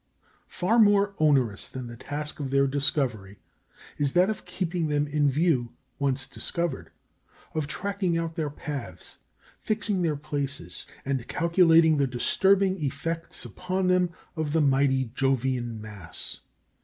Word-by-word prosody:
Far 210 +6 +1
more 205 -2 +5
onerous 135 -9 +2
than 130 -1 -7
the 120 0 -8
task 150 +5 -5
of 140 -2 -3
their 140 +1 +3
discovery 135 -8 0 0.6
is 145 -2 +1
that 185 +4 +4
of 215 - -7
keeping 180 -2 -2
them 145 -1 +1
in 145 0 +2
view 135 -5 +1 0.3
once 135 -2 0
discovered 170 +1 -2 0.6
of 155 -2 -1
tracking 195 -1 -1
out 165 -1 -2
their 160 -3 -2
paths, 140 - -7 0.5
ixing 210 -3 0
their 160 -3 +1
places, 140 -1 -5 0.2
and 135 -3 -2
calculating 165 -2 +4
the 140 -1 +2
disturbing 190 +8 +2
effects 165 +4 -3
upon 185 0 -2
them 180 -1 +3 0.3
of 155 -2 -2
the 160 - +3
mighty 135 -3 +2
Jovian 130 -3 0
mass. 100 -6 -7
150 Hz, 135 wpm, -27 LUFS, 135-175 Hz, 0.6 s, more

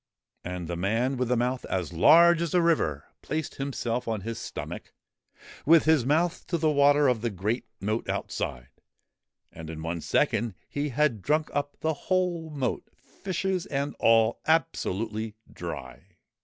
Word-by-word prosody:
' - - -65
And 90 -1 -5
the 85 - -3
man 115 +9 0
with 125 -1 -1
the 125 0 +1
mouth 125 +2 -1
as 90 -3 -3
large 170 - +6
as 170 0 -1
a 175 - +5
river 75 - +1 0.2
placed 160 -2 -4
himself 125 -3 -2
on 110 -3 -2
his 115 +3 -5
stomach, 115 - -7 0.7
with 160 0 +5
his 155 -6 +3
mouth 165 +5 +1
to 170 - 0
the 155 -1 +2
water 145 0 +5
of 125 -4 +1
the 120 - 0
great 105 +5 -2
moat 110 +4 -2
outside, - - -3 0.8
and 80 -1 -9
in 80 -1 -7
one 85 0 -3
second 110 +4 +1
he 145 +1 -2
had 135 -5 +1
drunk 155 +7 0
up 145 0 -2
the 160 0 +1 0.2
whole 180 -3 0
moat, 140 -5 -3
fishes 190 -1 -3
and 140 0 -2
all, 115 0 +4
absolutely 110 - 0 0.2
dry. 75 -7 -7
125 Hz, 160 wpm, -27 LUFS, 105-155 Hz, 0.8 s, large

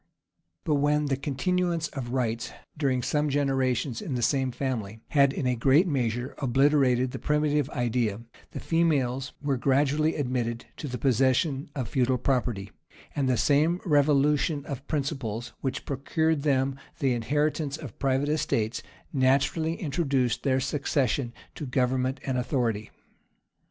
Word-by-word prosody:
But 150 -5 +1
when 150 +1 +2
the 140 -2 +1
continuance 165 +5 -1
of 130 -4 -6
rights, 120 -3 -1 0.2
during 135 -4 0
some 150 +3 +1
generations, 135 -3 0
in 165 -11 -3
the 120 - -1
same 130 +1 +1
family, 115 -5 -3
had, 140 -2 +4
in 140 - -3
a 125 0 +2
great 135 - +4
measure, 125 -3 -1
obliterated 130 -1 +3
the - - -6
primitive 150 -1 +1
idea, 120 -5 -1 0.3
the - - -7
females 145 -5 0
were 140 -2 +1
gradually 145 +4 +2
admitted 125 -4 -2
to 150 - -5
the 125 -2 -4
possession 135 +3 +1
of 130 -5 -2
feudal 130 -2 +1
property; 120 -6 -1 0.4
and 135 -3 +1
the 125 - +2
same 155 +7 +3
revolution 145 -1 +2
of 140 -1 -6
principles 130 -6 -3
which 135 -1 -3
procured 150 +3 0
them 135 -2 +1 0.2
the 135 -3 +1
inheritance 145 +4 0
of 145 -9 -10
private 135 +1 +1
estates, 130 -6 0 0.3
naturally 140 +4 +2
introduced 135 -6 0
their 130 -2 +2
succession 140 -2 0 0.2
to 150 - -6
government 130 +1 0
and 130 -2 0
authority. 120 -5 -1
135 Hz, 140 wpm, -27 LUFS, 125-150 Hz, 0.4 s, had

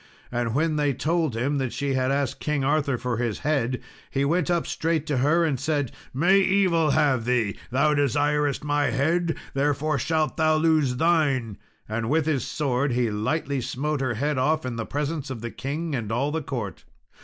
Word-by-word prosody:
And 120 -1 -1
when 155 +1 +1
they 145 -3 +1
told 160 -3 0
him 140 +4 0
that 130 -3 -1
she 140 -1 -2
had 130 0 +1
asked 140 -1 -1
King 150 -2 -1
Arthur 140 -2 +1
for 120 -1 -2
his 120 -3 -2
head, 130 -5 +1 0.3
he 135 0 0
went 165 +2 +1
up 170 -1 +1
straight 160 -2 -1
to 145 -4 -1
her 155 +6 +3
and 140 -6 0
said, 145 -2 -1 0.2
"May 180 +9 +4
evil 185 -5 +3
have 135 -5 +2
thee! 120 -5 +1
Thou 140 +5 +2
desirest 145 +1 +1
my 145 0 +1
head, 165 +6 +1 0.2
therefore 145 +1 0
shalt 155 +1 0
thou 155 -1 +3
lose 155 -5 +2
thine;" 135 - +1 0.3
and 110 +1 -2
with 155 +1 +2
his 145 -6 0
sword 140 -2 0
he 120 -2 +1
lightly 135 +6 -1
smote 145 +4 -2
her 130 -3 -1
head 145 +3 0
off, 155 +2 +1
in 125 -2 -3
the 115 -1 -4
presence 145 0 -3
of 125 -4 -5
the 120 0 -5
king 150 +4 -4
and 115 -5 -3
all 135 +6 0
the 160 +1 -1
court. 120 -8 -5
145 Hz, 190 wpm, -25 LUFS, 125-155 Hz, 0.3 s, May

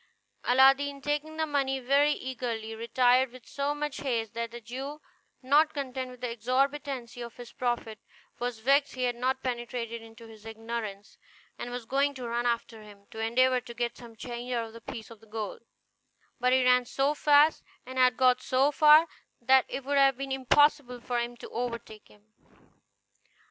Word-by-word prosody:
Aladdin, 270 +2 +4
taking 295 +2 -3
the 320 - +1
money 275 -3 0
very 280 +3 +3
eagerly, 235 -5 -4
retired 245 +3 +2
with 255 -1 -14
so 285 +1 -2
much 295 -1 -4
haste 230 -6 -2
that 230 0 -3
the 240 +1 -9
Jew, 265 +6 -7 0.4
not 295 +5 +3
content 260 -2 -4
with 250 -1 -13
the 250 -2 -3
exorbitancy 255 +1 -1
of 235 0 -8
his 245 -1 -10
profit, 240 -3 -3 0.4
was 245 -1 -3
vexed 275 +5 +2
he 255 - -2
had 245 -1 0
not 260 +2 -1
penetrated 240 -2 -4
into 225 0 -14
his 220 -2 -14
ignorance, 225 -2 -6 0.4
and 240 - -5
was 245 -1 -6
going 280 +3 +1
to 250 -2 -6
run 240 +1 -1
after 235 -1 -2
him, 205 -1 -15
to 220 - -9
endeavor 250 +3 +2
to 235 - -10
get 240 0 -2
some 235 -2 -13
change 240 +2 -6
out 235 -2 -1
of 225 - -12
the 230 - -11
piece 230 -2 -8
of 225 -1 -15
gold; 215 -2 -5 0.8
but 250 +1 +2
he 260 0 +4
ran 250 0 +5
so 275 +4 0
fast, 295 +1 +4 0.2
and 260 0 -5
had 250 0 +4
got 255 -1 +4
so 265 +3 +2
far, 305 +2 +7 0.3
that 260 +2 +4
it 275 - -5
would 285 0 +2
have 270 -2 +4
been 275 0 -5
impossible 270 -1 +3
for 240 0 -2
him 240 0 -4
to - - -9
overtake 235 -3 -5
him. 210 +1 -24
250 Hz, 180 wpm, -28 LUFS, 235-275 Hz, 0.8 s, far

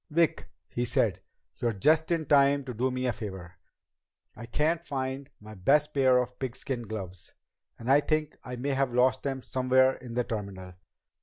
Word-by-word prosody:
"Vic," 165 0 +1 0.2
he 120 - -2
said, 120 - +1 0.4
"you're 120 -2 0
just 155 +10 +3
in 165 -2 +1
time 140 0 +4
to 130 -2 -6
do 125 +4 0
me 130 0 -2
a 125 - +1
favor. 95 -5 -8 0.8
I 115 +1 -9
can't 160 +7 0
find 135 -2 -4
my 110 +1 -11
best 140 +10 +2
pair 130 -2 +4
of 125 0 -2
pigskin 125 -2 -4
gloves, 95 -5 -7 0.4
and 115 - -9
I 135 +2 +6
think 155 0 -1
I 125 - -6
may 130 +4 -3
have 135 -2 0
lost 130 +1 +3
them 135 -2 -3
somewhere 130 0 +3
in 120 -2 -9
the 125 - +2
terminal. 100 -5 -6
130 Hz, 175 wpm, -28 LUFS, 115-140 Hz, 0.8 s, I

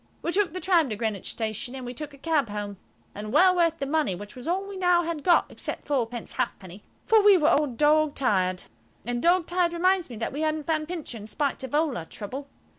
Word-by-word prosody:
We 340 - 0
took 385 -3 +1
the 370 - -4
tram 350 -7 +3
to 215 - -2
Greenwich 215 -3 -3
Station, 225 +3 -4
and 265 - -6
then - - -7
we 245 - -5
took 295 +3 -7
a 280 - -14
cab 295 -4 0
home 205 -1 -5 0.4
(and 210 +1 -6
well 370 +6 +5
worth 335 -2 +2
the 275 - -3
money, 290 - 0
which 205 +3 -10
was 250 +2 -8
all 380 +3 -1
we 400 - -7
now 355 -2 +3
had 325 -3 -4
got, 350 -2 +5
except - - -5
fourpence 245 -5 -2
halfpenny), 185 +2 -3 0.2
for 445 -1 +5
we 405 -2 +7
were 305 -3 +3
all 295 +1 +3
dog 300 +3 +2
tired. 185 -8 +1 0.4
And 240 0 -2
dog 350 +2 +3
tired 350 -1 +1
reminds 365 0 +2
me 240 - -8
that 225 +3 -4
we 295 - -3
hadn't 310 -1 -1
found 310 -1 -1
Pincher, 315 -9 -6
in 210 - -9
spite 275 +3 -2
of 265 +2 -4
all 300 -4 +1
our 165 - -5
trouble. 255 - -7
295 Hz, 240 wpm, -26 LUFS, 230-340 Hz, 0.4 s, we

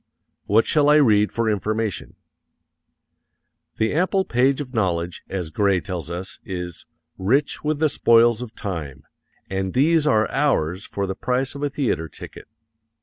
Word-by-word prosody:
What 110 +3 +3
shall 150 -1 +3
I 150 - +6
read 105 -8 +4
for 115 -1 -1
information? 110 -1 -2 1.6
The 110 0 0
ample 185 +4 +1
page 130 -1 +2
of 135 -3 -6
knowledge, 90 -6 -1
as 90 -5 -4
Grey 100 +2 +2
tells 85 -3 -6
us, 90 +2 -6
is 90 -3 -6 0.3
"rich 125 +10 +1
with 150 0 0
the 155 +1 +3
spoils 115 -4 +4
of 115 -3 -8
time," 80 -10 -6 0.4
and 95 -1 -3
these 155 +3 +3
are 110 -6 +3
ours 100 - 0
for 100 - -3
the 95 - -3
price 125 +5 -1
of 140 - -8
a 145 - 0
theatre 115 - -2
ticket. - - -11
110 Hz, 150 wpm, -22 LUFS, 95-135 Hz, 1.6 s, I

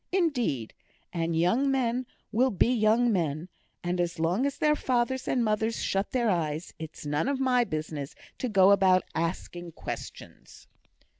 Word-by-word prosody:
Indeed, 245 - 0 0.4
and 165 -1 -1
young 225 +12 +2
men 255 -2 0 0.2
will 255 +4 +3
be 235 +3 +2
young 230 +1 +3
men; 165 -1 -1 0.3
and, 175 0 0
as 175 -1 -2
long 175 +11 +1
as 280 - -4
their 300 0 +3
fathers 255 -1 0
and 245 -2 +1
mothers 220 +1 0
shut 195 +1 0
their 245 -2 0
eyes, 160 -1 -2
it's 160 -1 -8
none 145 - 0
of 275 -1 0
my 255 -2 +3
business 155 -5 -5 0.2
to 255 - -2
go 195 -2 +6
about 185 -2 +5
asking 170 +1 -4
questions." - - -9
200 Hz, 155 wpm, -28 LUFS, 165-250 Hz, 0.4 s, go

